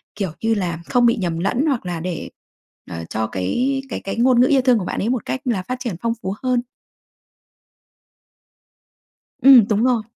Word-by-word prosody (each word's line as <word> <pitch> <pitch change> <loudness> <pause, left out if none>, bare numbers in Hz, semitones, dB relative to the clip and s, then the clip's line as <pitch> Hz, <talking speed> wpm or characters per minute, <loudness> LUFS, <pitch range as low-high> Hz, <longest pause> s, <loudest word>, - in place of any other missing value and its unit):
kiểu 195 -4 -3
như 225 0 +1
là, 175 -6 -2
không 245 -1 +3
bị 235 - +4
nhầm 170 -5 -2
lẫn, 235 - 0
hoặc 265 -9 -1
là 175 -2 -3
để, 175 0 -5 0.6
ờ, 85 0 -5
cho 110 0 -2
cái 250 - -1
cái - - -4
cái 195 - -4
ngôn 245 +1 +4
ngữ 250 - +5
yêu 275 -1 +3
thương 250 -3 +3
của 185 - -4
bạn - - -3
ấy 220 - -1
một 250 -2 -2
cách 260 - -3
là 230 -7 0
phát 250 +7 -4
triển 240 -7 -4
phong 230 0 0
phú 190 +1 -3
hơn? 250 -1 +1 2.8
Ừm, 260 -6 +8
đúng 215 +1 +1
rồi. 245 -3 +2
225 Hz, 195 wpm, -20 LUFS, 185-250 Hz, 2.8 s, Ừm